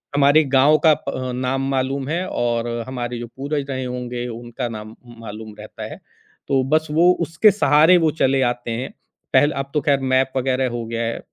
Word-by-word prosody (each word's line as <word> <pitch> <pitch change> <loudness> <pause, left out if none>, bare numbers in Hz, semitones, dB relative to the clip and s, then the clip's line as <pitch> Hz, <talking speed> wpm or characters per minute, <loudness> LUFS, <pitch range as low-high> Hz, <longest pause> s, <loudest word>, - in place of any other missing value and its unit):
हमारे 145 +2 +5
गाँव 140 +2 +4
का 155 - +7
प - - -8
अ, 130 -1 -4
नाम 130 +2 -1
मालूम 135 0 -1
है 170 +5 -1
और 120 -1 -1 0.2
हमारे 120 -2 -4
जो 120 - -6
पूर्वज 140 +1 -3
रहे 130 -1 -3
होंगे 125 -1 -4
उनका 120 +1 -5
नाम 110 0 -8 0.2
मालूम 110 -1 -9
रहता 105 - -9
है। - - -10 0.5
तो 135 -2 +2
बस 155 +1 +2
वो 170 +4 +5
उसके 170 +6 +4
सहारे 160 -1 +5
वो 160 - +4
चले 135 0 +3
आते 120 -1 -1
हैं, 120 +4 -3 0.4
पहले 145 +1 +4
अब 135 0 -4
तो 150 - +1
ख़ैर 140 -2 +2
मैप 130 0 +1
वग़ैरह 130 0 0
हो 120 -1 -4
गया 115 +1 -4
है, 115 0 -3
130 Hz, 195 wpm, -21 LUFS, 120-145 Hz, 0.5 s, का